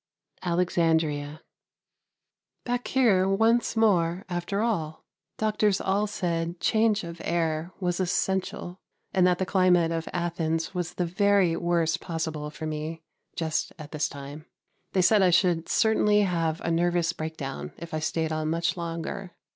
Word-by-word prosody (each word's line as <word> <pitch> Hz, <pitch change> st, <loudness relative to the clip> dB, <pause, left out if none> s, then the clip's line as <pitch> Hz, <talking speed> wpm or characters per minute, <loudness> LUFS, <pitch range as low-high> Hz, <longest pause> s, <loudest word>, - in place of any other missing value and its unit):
Alexandria. 160 Hz, -4 st, 0 dB, 1.2 s
Back 245 Hz, 0 st, -2 dB
here 205 Hz, -8 st, +3 dB
once 225 Hz, +5 st, +2 dB
more 185 Hz, -5 st, +2 dB
after 180 Hz, +4 st, -2 dB
all. 160 Hz, -9 st, -2 dB, 0.3 s
Doctors 215 Hz, -2 st, +1 dB
all 200 Hz, +2 st, +1 dB
said 170 Hz, -4 st, -2 dB
change 220 Hz, -2 st, +2 dB
of 170 Hz, 0 st, -8 dB
air 165 Hz, 0 st, -1 dB
was 180 Hz, -2 st, -1 dB
essential, 190 Hz, 0 st, -1 dB, 0.3 s
and 185 Hz, -1 st, +4 dB
that 180 Hz, -1 st, +3 dB
the 190 Hz, -, -1 dB
climate 180 Hz, -3 st, +3 dB
of 165 Hz, 0 st, -3 dB
Athens 165 Hz, -1 st, -2 dB
was 180 Hz, -1 st, -3 dB
the 180 Hz, -, 0 dB
very 195 Hz, -1 st, +3 dB
worst 165 Hz, -1 st, +1 dB
possible 160 Hz, -3 st, -3 dB
for 155 Hz, +1 st, -7 dB
me, 155 Hz, +1 st, -4 dB, 0.3 s
just 160 Hz, -1 st, -2 dB
at 150 Hz, -2 st, -10 dB
this 150 Hz, -1 st, -1 dB
time. 145 Hz, +3 st, -9 dB, 0.5 s
They 185 Hz, -, +3 dB
said 210 Hz, +2 st, +5 dB
I 185 Hz, -, +5 dB
should 170 Hz, -1 st, +2 dB
certainly 210 Hz, -1 st, +3 dB
have 165 Hz, -4 st, 0 dB
a 170 Hz, -, -1 dB
nervous 175 Hz, 0 st, +1 dB
breakdown 145 Hz, -, -5 dB
if 170 Hz, -1 st, -9 dB
I 155 Hz, -, 0 dB
stayed 160 Hz, 0 st, -1 dB
on 155 Hz, 0 st, -1 dB
much 165 Hz, 0 st, 0 dB
longer. 170 Hz, +2 st, -5 dB
170 Hz, 145 wpm, -27 LUFS, 160-190 Hz, 1.2 s, said